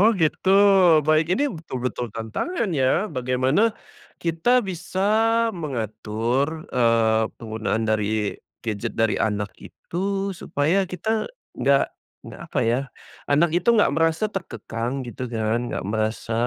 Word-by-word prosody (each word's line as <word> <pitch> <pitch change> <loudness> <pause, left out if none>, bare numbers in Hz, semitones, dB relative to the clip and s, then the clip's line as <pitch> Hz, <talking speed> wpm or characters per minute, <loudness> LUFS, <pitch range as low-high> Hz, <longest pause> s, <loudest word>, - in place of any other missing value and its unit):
Oh 210 - +7
gitu, 165 +2 0 0.6
baik 155 +1 +3
ini 285 -1 0
betul-betul 130 - -4
tantangan 190 - -2
ya, 145 +9 +1
bagaimana 130 - +1 0.4
kita 185 +9 +1
bisa 185 0 -5 0.5
mengatur, 130 - -2
eee, 115 -2 +3
penggunaan 110 0 -2
dari 110 -1 0 0.3
gadget 105 -3 -3
dari 115 -1 +1
anak 105 -2 -1
itu, 195 +2 -3
supaya 175 +2 0
kita 215 +5 -2 0.2
nggak 140 0 +2 0.3
nggak, - - -10
apa - - -3
ya, 115 +2 +2 0.5
anak 150 +4 +3
itu 175 +5 0
nggak 225 -10 +5
merasa 165 +6 +1
terkekang 120 - -4
gitu 125 +1 -6
kan, 110 -1 0
nggak - - -4
merasa 110 +2 -2
135 Hz, 120 wpm, -23 LUFS, 115-175 Hz, 0.6 s, Oh